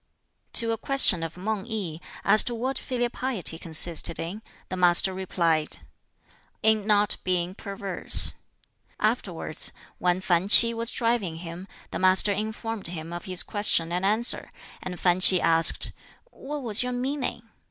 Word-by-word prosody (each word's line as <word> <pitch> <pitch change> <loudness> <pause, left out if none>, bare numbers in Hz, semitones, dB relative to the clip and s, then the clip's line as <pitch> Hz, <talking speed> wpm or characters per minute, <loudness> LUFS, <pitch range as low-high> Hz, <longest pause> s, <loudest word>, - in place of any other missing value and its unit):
To 230 -1 +7
a 225 - -4
question 250 -10 +3
of 165 +1 -7
Mang 205 +1 -4
i, 180 -8 -5 0.3
as 215 - +7
to 240 - -3
what 260 +4 -4
filial 245 -2 -4
piety 220 -13 -3
consisted 165 0 +2
in, 185 +6 -7 0.3
the - - -5
master 180 +1 +3
replied, 170 -4 -2 0.9
"In 220 -1 +1
not 210 -1 +1
being 180 -1 -2
perverse." 195 -1 +2 0.7
Afterwards, - - -4 0.3
when 180 0 -1
Fan 180 0 -1
Ch'i 230 +2 +7
was 230 0 -1
driving 230 -10 -2
him, 170 +3 -10 0.2
the - - -5
Master 185 +2 +3
informed 220 0 -5
him 165 -1 -8
of 175 - -8
this 185 -3 +1
question 185 -5 -1
and 180 +2 -3
answer, 215 +5 0 0.3
and 180 -1 -8
Fan 180 0 +1
Ch'i 185 0 +8
asked, 165 -1 +4 0.4
"What 290 0 -9
was 220 -3 +3
your 250 0 -3
meaning?" 255 -1 -5
195 Hz, 150 wpm, -24 LUFS, 175-225 Hz, 0.9 s, Ch'i